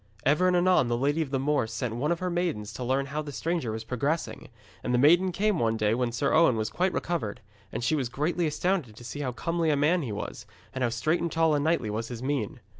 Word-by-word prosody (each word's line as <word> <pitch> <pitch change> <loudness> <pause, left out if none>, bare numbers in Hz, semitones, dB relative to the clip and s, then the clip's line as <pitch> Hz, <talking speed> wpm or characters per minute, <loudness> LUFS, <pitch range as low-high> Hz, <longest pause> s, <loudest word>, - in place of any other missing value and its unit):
Ever 150 +6 +4
and 180 -1 +3
anon 180 -7 +4
the 120 0 0
Lady 145 +5 +1
of 155 - -2
the 135 - 0
Moors 135 -4 0
sent 115 0 -3
one 145 +7 0
of 170 - +1
her 180 -1 -1
maidens 170 -13 -2
to 125 - -5
learn 135 +3 +1
how 145 +2 -3
the 150 -1 -7
stranger 155 0 -2
was 110 +1 -4
progressing, 140 +8 -2 0.3
and 125 - 0
the - - +3
maiden 170 +8 +5
came 205 +1 +1
one 115 -1 +1
day 105 0 +2
when 120 0 0
Sir 120 +4 0
Owen 160 -6 +5
was 110 0 -2
quite 185 +1 +1
recovered, 165 - -2 0.3
and 115 - -4
she 125 - +1
was 130 -5 -1
greatly 160 +6 0
astounded 155 - -1
to 120 - -12
see 135 +5 -6
how 135 -3 -2
comely 165 +5 -1
a 150 - +3
man 160 +5 +3
he 125 -7 -4
was, 105 - -6 0.3
and 130 -1 -2
how 120 - +2
straight 155 +9 0
and 170 -1 -1
tall 165 -1 +3
and 145 -1 +1
knightly 160 -9 +1
was 115 +2 -3
his 120 0 -7
mien. 135 -4 -2
145 Hz, 260 wpm, -27 LUFS, 120-165 Hz, 0.3 s, maiden